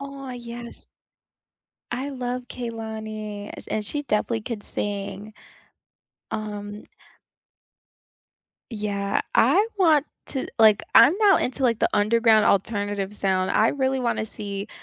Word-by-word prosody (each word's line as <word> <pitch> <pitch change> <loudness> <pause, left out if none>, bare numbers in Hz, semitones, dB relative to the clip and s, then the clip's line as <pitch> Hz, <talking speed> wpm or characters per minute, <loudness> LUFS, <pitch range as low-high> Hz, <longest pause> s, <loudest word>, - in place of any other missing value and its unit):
Oh, 275 -1 -7
yes 240 -1 -9 1.1
I 255 +4 -3
love 250 -1 -3
Kehlani, 220 -3 -6
a - - -8
and 215 - -1
she 290 +7 -2
definitely 225 -2 0
could 215 -2 -5
sing. 205 +1 -4 1.0
Um 210 -1 -5 1.9
Yeah, 205 - -1
I 415 - +5
want 310 -6 +4 0.2
to 265 - -3
like, 215 -2 +6
I'm 310 - +8
now 410 -4 +6
into, 260 +2 -2
like, 235 -3 +2
the - - +3
underground 220 +1 +4
alternative 205 0 0
sound, 190 -2 0
I 220 - +4
really 265 -1 0
wanna 235 -3 0
see, 200 -1 -5
220 Hz, 115 wpm, -24 LUFS, 205-250 Hz, 1.9 s, I'm